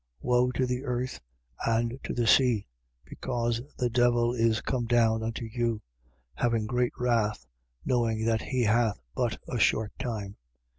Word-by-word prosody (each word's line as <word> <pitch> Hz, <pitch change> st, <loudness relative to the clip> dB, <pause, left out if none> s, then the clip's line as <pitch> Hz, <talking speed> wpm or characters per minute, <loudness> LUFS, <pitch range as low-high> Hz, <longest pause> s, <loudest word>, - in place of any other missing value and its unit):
Woe 125 Hz, 0 st, +2 dB
to 130 Hz, -, +1 dB
the 125 Hz, +1 st, -2 dB
earth 125 Hz, -1 st, -3 dB, 0.4 s
and 115 Hz, +2 st, 0 dB
to -, -, -3 dB
the 120 Hz, -, +1 dB
sea, 120 Hz, -2 st, +4 dB, 0.4 s
because 120 Hz, -2 st, -2 dB, 0.2 s
the 125 Hz, -, +1 dB
devil 120 Hz, 0 st, +3 dB
is 115 Hz, -2 st, +2 dB
come 120 Hz, +2 st, -2 dB
down 115 Hz, -2 st, +3 dB
unto 115 Hz, +1 st, -3 dB
you, 115 Hz, -1 st, -2 dB, 0.5 s
having 115 Hz, -, 0 dB
great 125 Hz, +2 st, 0 dB
wrath, 115 Hz, -, 0 dB, 0.4 s
knowing 115 Hz, -3 st, +1 dB
that 115 Hz, -1 st, +2 dB
he 130 Hz, -2 st, -1 dB
hath 110 Hz, -1 st, +2 dB
but -, -, -1 dB
a -, -, -2 dB
short 110 Hz, -1 st, +2 dB
time. 105 Hz, -5 st, -4 dB
120 Hz, 150 wpm, -28 LUFS, 110-125 Hz, 0.5 s, sea